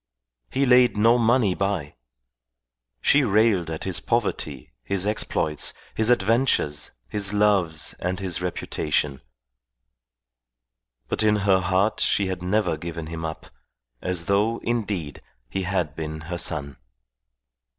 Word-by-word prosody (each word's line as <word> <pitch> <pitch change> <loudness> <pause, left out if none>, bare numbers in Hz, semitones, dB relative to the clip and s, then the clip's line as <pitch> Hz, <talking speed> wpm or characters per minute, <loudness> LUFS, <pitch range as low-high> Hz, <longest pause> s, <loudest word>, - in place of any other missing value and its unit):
He 135 +1 +1
laid 125 -3 +5
no 115 +3 +5
money 115 -3 +3
by. 95 -7 -2 1.1
She 140 0 +4
railed 105 -6 +2
at 80 -1 -5
his 95 -3 -1
poverty, 90 - -2
his 95 +9 0
exploits, 80 -7 0 0.2
his 110 +1 +2
adventures, 115 - +2 0.2
his 100 +3 +1
loves 100 -7 +1
and 90 +1 -2
his 90 -3 -3
reputation; 75 -5 -2 1.9
but - - -1
in 105 -1 +4
her 95 -2 +4
heart 95 +3 +1
she 100 - +2
had 95 -1 -3
never 95 -2 0
given 85 0 -6
him 80 +1 -6
up, 80 -1 -6 0.5
as 90 -2 -1
though, 105 +4 +2
indeed, 100 -10 -3 0.3
he 95 - -2
had 90 -6 -1
been 80 -1 -5
her 85 +3 -5
son. 70 -3 -3
95 Hz, 125 wpm, -24 LUFS, 80-105 Hz, 1.9 s, laid